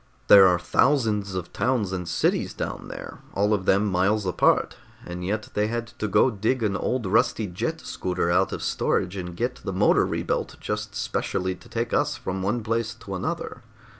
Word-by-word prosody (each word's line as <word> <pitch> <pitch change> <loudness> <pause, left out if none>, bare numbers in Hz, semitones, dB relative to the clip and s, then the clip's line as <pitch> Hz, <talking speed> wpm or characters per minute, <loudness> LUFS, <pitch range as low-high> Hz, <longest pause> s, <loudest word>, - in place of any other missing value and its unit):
"There 100 -2 +10
are 90 -1 +4
thousands 105 -1 +1
of 90 -2 -5
towns 120 -7 0
and 90 -2 -4
cities - - 0
down - - -5
there, - - -8 0.2
all 105 +2 +2
of 95 -3 -1
them 100 +2 +4
miles 100 +2 +1
apart, 90 - +2 0.3
and 90 0 -6
yet 105 +3 -2
they 105 0 +1
had 115 +1 -2
to 110 - -1
go 115 +6 +4
dig 110 +4 0
an 100 -2 +1
old 120 +5 -1
rusty 110 +2 +2
jet 90 -2 -3
scooter 90 -2 -2
out 90 - +2
of - - -4
storage 90 - 0
and 90 -2 -6
get 120 +2 -1
the 95 - -5
motor 95 - +3
rebuilt - - -2
just - - -4
specially 95 0 -1
to 90 - -16
take - - -2
us - - +1
from 95 +1 -4
one 105 +5 -1
place 115 0 -1
to 105 -4 -9
another. 90 - -4
100 Hz, 190 wpm, -25 LUFS, 90-110 Hz, 0.3 s, There